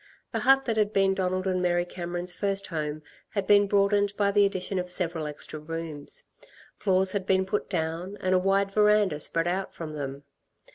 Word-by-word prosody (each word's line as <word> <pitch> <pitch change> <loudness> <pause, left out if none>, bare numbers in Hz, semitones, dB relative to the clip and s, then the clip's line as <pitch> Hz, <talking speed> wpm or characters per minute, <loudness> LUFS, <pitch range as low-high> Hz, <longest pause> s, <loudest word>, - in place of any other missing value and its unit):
The - - -1
hut 270 0 +4
that 230 -3 -1
had 210 -1 +2
been 195 -1 +3
Donald 185 0 -1
and 185 -1 0
Mary 175 -1 +1
Cameron's 175 0 -4
first 200 0 -2
home 155 -2 -4 0.3
had 200 -2 -2
been 205 0 +5
broadened 200 0 +2
by 200 -1 +2
the 200 0 +5
addition 190 -1 -2
of 180 0 -4
several 170 -4 -1
extra 150 +1 -6
rooms. 160 -1 -6 0.5
Floors 190 -1 +2
had 195 -1 -3
been 190 0 +3
put 190 - -2
down 175 +2 -3
and 185 0 0
a 185 - +5
wide 195 +1 +2
verandah 210 -6 +3
spread 165 +2 +1
out 190 +2 -2
from 160 -2 -6
them. 140 -1 -5
185 Hz, 190 wpm, -27 LUFS, 165-200 Hz, 0.5 s, been